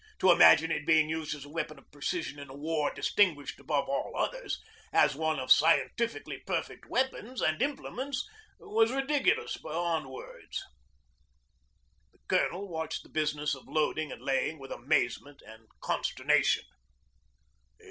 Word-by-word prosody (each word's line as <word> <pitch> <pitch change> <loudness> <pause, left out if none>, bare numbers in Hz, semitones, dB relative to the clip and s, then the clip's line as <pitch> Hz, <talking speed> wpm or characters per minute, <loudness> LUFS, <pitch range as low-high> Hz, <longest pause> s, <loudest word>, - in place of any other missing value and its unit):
To 185 - +5
imagine 165 -1 +7
it - - -1
being 155 -1 +5
used 160 -1 -2
as 145 -1 -10
a - - -12
weapon 155 0 -4
of - - -20
precision 145 0 -3
in 140 -1 -9
a 135 - -10
war 150 0 -1
distinguished 170 -9 +1
above 140 +1 -1
all 140 - -2
others - - -2 0.3
as - - +4
one 160 0 0
of 130 -1 -3
scientifically 225 +8 +3
perfect - - -4
weapons 260 -1 -1
and 155 +7 +1
implements 275 0 -2 0.3
was 440 +2 +1
ridiculous 270 +1 +1
beyond 160 -2 -2
words. 130 - -8 1.5
The - - -30
Colonel 195 +4 +1
watched 160 -3 -4
the - - -18
business 150 -1 0
of 135 - -9
loading 155 0 0
and - - -9
laying 140 +3 0
with 135 -2 -11
amazement 140 +1 -1
and 110 0 -14
consternation. - - +1
155 Hz, 140 wpm, -30 LUFS, 145-185 Hz, 1.5 s, imagine